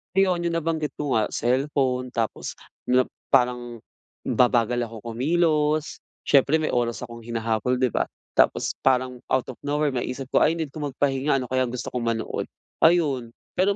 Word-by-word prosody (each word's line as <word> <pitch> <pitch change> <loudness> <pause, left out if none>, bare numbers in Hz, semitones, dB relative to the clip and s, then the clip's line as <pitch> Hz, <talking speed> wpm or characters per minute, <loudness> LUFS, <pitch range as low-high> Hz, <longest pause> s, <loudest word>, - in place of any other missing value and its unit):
Ayun, 185 -3 +3
'yung 170 -1 0
nabanggit 160 -2 -2
ko 145 -2 0
nga, 110 -2 +1
cellphone 130 0 0
tapos 115 -3 -2 0.8
parang, 125 -2 +2 0.5
babagal 120 -1 +3
ako 115 -1 -10
kumilos. 150 +4 +1 0.3
Siyempre, 140 +3 +4
may 155 - 0
oras 120 -1 0
akong 120 -1 -8
hinahabol, 115 +1 -1
'di 130 -1 +3
ba? - - +1 0.3
tapos - - +2
parang 130 -1 +1
out 130 -1 +2
of 125 - -15
nowhere 145 0 0
maiisip 125 +1 -3
ko, - - +4
"Ay, 160 +2 +3
need 160 -4 -4
ko 155 - -8
magpahinga, 135 +1 0
ano 130 -2 -3
kayang 130 -1 +2
gusto 125 0 -5
kong 125 -1 -2
manood" 110 - -4 0.3
ayun, 155 -8 +3 0.2
pero 195 +2 +2
130 Hz, 155 wpm, -24 LUFS, 120-150 Hz, 0.8 s, Siyempre